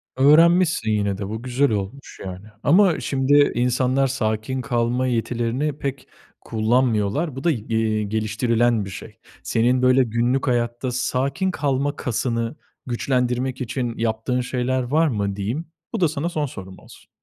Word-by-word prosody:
Öğrenmişsin 160 -2 +4
yine 100 -2 0
de. 100 -1 -4
Bu 110 +1 -5
güzel 130 +2 +1
olmuş 105 +6 -5
yani 95 +2 -8 0.2
ama 180 +2 +4
şimdi, 145 +1 +3
insanlar 125 +2 +2
sakin 110 +1 -2
kalma 125 0 0
yetilerini 120 +4 -1
pek 135 -2 -5 0.3
kullanmıyorlar. 115 +4 0
Bu 135 - -6
da, 170 - +3
y 140 - -1
iii, 110 -2 0
geliştirilen 110 +1 +1
bir - - -7
şey. 95 - -10 0.3
Senin 125 +3 +2
böyle, 130 +1 +5
günlük 120 +4 0
hayatta 120 +1 0
sakin 135 +8 -1
kalma 145 -2 -1
kasını, 115 0 -2 0.3
güçlendirmek 125 +1 -1
için 125 -1 -3
yaptığın 115 +2 -1
şeyler 125 +1 -1
var 155 +6 +2
mı 100 -7 -1
diyeyim, 115 +12 -3 0.3
bu 225 - -1
da 170 - +5
sana 155 +2 -2
son 155 -4 -1
sorum 95 -8 -9
olsun. - - -17
125 Hz, 145 wpm, -22 LUFS, 115-135 Hz, 0.3 s, böyle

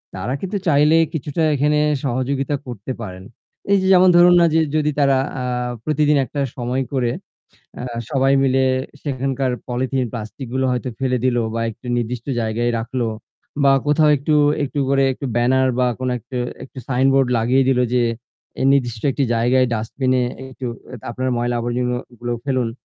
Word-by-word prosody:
তারা 105 +7 -3
কিন্তু 195 +2 -2
চাইলে 150 0 +4 0.2
কিছুটা 155 +1 -2
এখানে 150 +2 +2 0.3
সহযোগিতা 135 +2 -1
করতে 120 -1 -6
পারেন। 95 -3 -7 0.5
এই 200 - +6
যে 190 - 0
যেমন 185 0 +6
ধরুন 175 0 +7
না - - +6
যে 160 - +4 0.2
যদি 150 -1 +2
তারা 140 -2 +4 0.2
আ - - -3 0.4
প্রতিদিন 150 -1 +2
একটা 140 +2 -4
সময় 125 +2 -2
করে 125 -3 +1 0.7
আ - - -5 0.3
সবাই 135 0 +2
মিলে 135 0 +2 0.4
সেখানকার 135 -2 -1 0.2
পলিথিন 130 +2 -1
প্লাস্টিক 115 +3 -7
গুলো 130 0 +1
হয়তো 125 0 -2
ফেলে 130 -1 +1
দিলো 120 -2 +2
বা 115 - -2
একটু 115 +3 -18
নির্দিষ্ট 120 0 -3 0.2
জায়গায় 115 +2 0
রাখলো 120 +1 -2 0.6
বা 140 - +6
কোথাও 150 +1 +4
একটু, 150 +3 0 0.3
একটু 145 +1 -3
করে 135 0 +3
একটু 140 - -7
ব্যানার 130 +2 +3
বা 125 - +3
কোনো 130 -1 -1
একটা, 125 +3 -7 0.3
একটা 135 - -10
সাইনবোর্ড 135 0 +3
লাগিয়ে 125 +4 +3
দিলো 125 -1 +3
যে 125 - +3 0.6
এই - - +2
নির্দিষ্ট 120 -5 0
একটি 140 +1 -1
জায়গায় 125 +3 +3
ডাস্টবিন 125 +4 -1
এ - - +2 0.3
একটু 130 0 -8 0.4
আপনার 130 +2 -2
ময়লা 120 0 -1
আবর্জনা 125 +1 -1 0.2
গুলো 120 0 -3
ফেলুন। 130 -4 0
130 Hz, 165 wpm, -20 LUFS, 120-140 Hz, 0.7 s, ধরুন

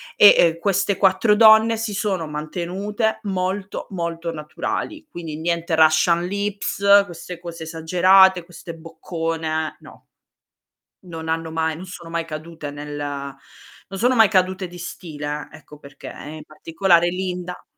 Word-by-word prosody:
E 205 - +8
e 165 -1 +3
queste 195 +1 +1
4 200 +2 +3
donne 220 +1 +6
si 220 -2 -3
sono 190 -6 -2
mantenute 185 +8 -3
molto, 190 0 -3
molto 170 -2 -4
naturali, 235 - -5
quindi 160 -3 -7
niente 170 0 -1
russian 160 +2 +4
lips, 200 0 +2
queste 175 -1 -9
cose 170 -1 -8
esagerate, 180 +3 +4
queste 170 -1 -10
boccone, 165 -1 -4
no. - - -15 1.0
Non 165 -2 -8
hanno 165 0 -2
mai 160 0 -1
non 180 +4 -9
sono 170 -2 -10
mai 170 0 -2
cadute 155 -1 -7
nel 145 0 -8
non 145 +6 -8
sono 250 +2 +3
mai 225 -4 +6
cadute 185 -1 +1
di 175 0 -12
stile, 150 -4 -6
ecco 150 -1 -14
perché, 140 -1 -13
in 155 +1 -9
particolare 170 +3 +1
Linda 180 -1 -5
170 Hz, 135 wpm, -21 LUFS, 160-190 Hz, 1.0 s, E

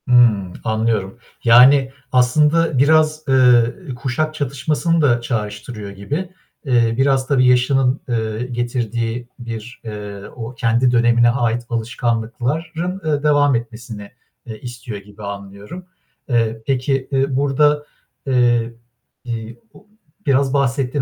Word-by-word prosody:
Hımm, 115 -7 +4
anlıyorum. 110 -2 -1 0.3
Yani, 130 +3 +6 0.2
aslında 150 +5 +3
biraz, 155 +2 +3
eee, 125 +3 +3
kuşak 135 +6 -2
çatışmasını 150 +4 0
da 120 -5 +3
çağrıştırıyor 105 -2 -5
gibi. 145 - -4 0.4
Eee, 120 -4 +2
biraz 135 -1 +2
tabii 135 -2 +3
yaşının, 130 +1 +3
eee, 110 0 -2
getirdiği 120 -1 -3
bir, 120 +1 -8
eee, 105 -2 -7
o 115 0 -7
kendi 120 +1 +2
dönemine 120 0 +4
ait 120 -1 0
alışkanlıkların, 125 +10 -2
eee, 150 -2 0
devam 145 -2 +3
etmesini, 115 -3 -6 0.3
eee, 110 -3 -8
istiyor 120 -3 -7
gibi 105 +1 -13
anlıyorum. 100 - -8 0.4
Eee, 115 -2 0
peki, 135 0 0
eee, 135 0 0
burada, 145 +2 +2 0.4
eee, 120 -3 +2 0.5
i 115 -1 -6 0.2
o - - -19 0.4
biraz 135 0 +2
bahsettin 135 0 0
125 Hz, 115 wpm, -19 LUFS, 115-140 Hz, 0.5 s, Yani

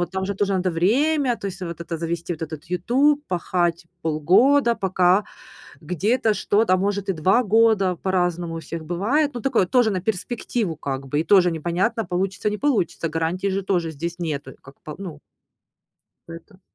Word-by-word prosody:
вот 175 -1 -2
там 190 0 -2
же 200 +1 -2
тоже 200 0 0
надо 185 -1 0
время, 255 - +2
то 200 - -6
есть 195 -1 -6
вот 170 -2 -6
это: 170 0 -4
завести 170 +1 -3
этот 160 -1 -6
вот 155 0 -7
"Ютуб", 255 - +1
пахать 175 -1 -1 0.2
полгода, 215 - +3
пока 185 0 +2 0.6
где-то 210 - +1
что-то, 205 -1 +2
а - - +4
может, 200 +1 -1
и - - +2
2 185 +9 +2
года, 210 -4 +3
по-разному 175 -2 -1
у 165 - -4
всех 165 0 -7
бывает, 230 - 0
но 240 - -5
такое 240 -8 +2
тоже 245 +2 +3
на 190 - -1
перспективу 215 -1 -2
как 135 -2 -4
бы, 145 +3 -1
и 160 - +1
тоже 180 -3 +4
непонятно, 175 +8 -1
получится, 190 +3 -1
не 210 - -3
получится, 215 - 0
гарантии 165 +4 -1
же 195 0 -1
тоже 175 -4 0
здесь 170 +3 -5
нету 145 -6 -4
как 135 +1 -15
по 150 - -8
ну. 175 -6 -8 1.1
Поэто 170 +4 -12
185 Hz, 180 wpm, -23 LUFS, 170-210 Hz, 1.1 s, а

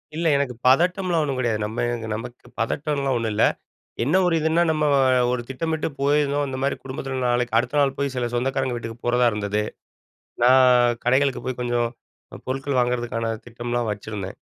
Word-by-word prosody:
இல்ல 165 +1 0
எனக்கு 135 -4 -1
பதட்டம்லாம் 175 +4 +3
ஒண்ணும் 140 -3 -2
கெடையாது. 115 -4 0
நம்ம 110 +3 -2 0.3
நமக்கு 120 +2 -8
பதட்டம்லாம் 140 +2 -1
ஒண்ணும் 115 -2 -2
இல்ல. 110 - +3 0.6
என்ன 150 +8 +2
ஒரு 175 -2 +2
இதுனா, 160 +2 +2
நம்ம 155 -1 +1 0.5
ஒரு 125 -1 -1
திட்டமிட்டு 160 +4 -2
போயிருந்தோம். 145 0 +2
இந்த 130 0 -4
மாரி 140 - +1
குடும்பத்தில 135 0 -5
நாளைக்கு 120 -1 +1
அடுத்த 125 +5 0
நாள் 135 -1 +2
போய் 140 -1 -1
சில 125 -1 0
சொந்தக்காரங்க 130 +1 0
வீட்டுக்கு 115 -1 -7
போறதா 125 0 +3
இருந்தது. 105 0 -1 0.8
நான் 125 -1 +5
கடைகளுக்கு 130 +2 +2
போய் 130 -1 -3
கொஞ்சம் 120 -1 0 0.5
அ - - -7
பொருட்கள் 135 +1 -1
வாங்குறதுக்கான 120 -2 -1
திட்டம்லா 120 0 -3
வச்சுருந்தேன். 105 -2 -6
125 Hz, 155 wpm, -23 LUFS, 120-140 Hz, 0.8 s, நான்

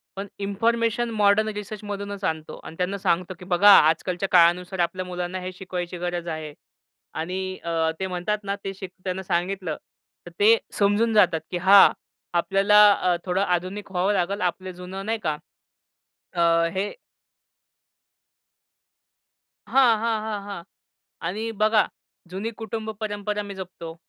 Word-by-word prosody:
पण 195 +1 -5
information 230 +3 0
modern 210 0 +3
रिसर्चमधूनच 205 -1 -6
आणतो. 160 -3 -3
आणि - - -10
त्यांना 185 +2 -1
सांगतो 180 -1 0
की 180 - -11
"बघा 190 +3 +5 0.2
आजकालच्या 180 +4 -1
काळानुसार 180 +2 +4
आपल्या 180 +2 -1
मुलांना 180 +1 -4
हे 185 0 -5
शिकवायची 180 -1 -5
गरज 175 0 -3
आहे." 155 -2 -5 0.6
आणि 185 +3 -4
अ, 165 -1 0
ते 190 - -2
म्हणतात 185 +3 -2
ना 200 0 -2
ते 195 - -3
त्यांना 185 +1 -6
सांगितलं 180 -1 -2 0.5
तर 175 - -10
ते 220 +3 +6 0.2
समजून 210 +3 +2
जातात 180 -6 +4
की 180 - -1
हां, 195 +3 +7 0.5
आपल्याला 195 +4 +4
अ, 180 -2 +1
थोडं 185 +1 0
आधुनिक 185 +2 -2
व्हावं 190 +3 +1
लागेल. 195 +2 -1
आपलं 185 +1 -2
जुनं 185 +2 -8
नाही 225 +1 -1
का, 150 -1 -1 1.0
अ, 170 -1 +3
हे 195 +2 -2 2.8
हां, 245 -5 +4
हां, 225 -1 0
हां, 215 -2 -4
हां. 200 -4 -7 0.7
आणि 220 +5 -3
बघा 215 -2 +4 0.4
जुनी 200 +5 -4
कुटुंब 220 0 -5
परंपरा 210 -1 -3
मी 200 -1 -8
जपतो. 175 -3 -8
190 Hz, 135 wpm, -24 LUFS, 175-205 Hz, 2.8 s, हां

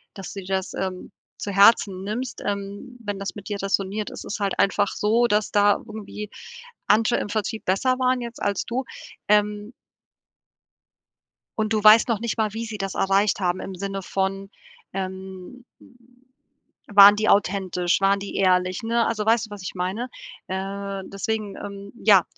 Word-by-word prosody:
dass 195 -4 -8
du 200 - -6
dir 180 - -12
das, 190 0 -3
ähm, 185 0 -4 0.3
zu 200 - -4
Herzen 195 -1 +5
nimmst, 240 +5 -4
ähm, 200 +5 -5
wenn 205 -1 -4
das 195 - -5
mit 205 +1 -9
dir 205 -1 -3
räsoniert. 195 +1 -1
Es - - -8
ist 210 - -5
halt 200 -1 -1
einfach 200 +1 +3
so, 230 +3 +2
dass 210 -1 +1
da 205 0 +5
irgendwie 210 -1 -7 0.6
andere 220 +3 +3
im - - -3
Vertrieb 215 +1 -3
besser 255 +8 +1
waren 255 -1 +2
jetzt 235 0 -7
als 200 -1 -1
du, 245 +3 -2 0.4
ähm 210 +1 +1 1.9
und 220 0 0
du 215 -1 0
weißt 215 +3 +7
noch 225 -3 0
nicht 235 0 -3
mal, 215 -2 +1
wie 230 - -3
sie 220 -2 -6
das 195 -1 -3
erreicht 195 +1 +2
haben 180 0 0
im 190 - -6
Sinne 195 +1 -4
von, 195 +1 -2 0.4
ähm, 190 +4 -7
hm, 245 +1 -23 0.6
waren 205 0 +9
die 215 - 0
authentisch, 185 -3 +2
waren 195 0 +3
die 200 0 -6
ehrlich, 185 0 +2
ne? 230 +1 +1
Also 215 -2 -1
weißt 225 0 +3
du, - - -21
was 205 -2 -8
ich 185 - -6
meine? 190 +7 -3 0.4
Äh, 195 +1 -4
deswegen, 210 +1 -3
ähm, 200 0 -8
ja, 200 -6 +5
205 Hz, 170 wpm, -24 LUFS, 195-220 Hz, 1.9 s, waren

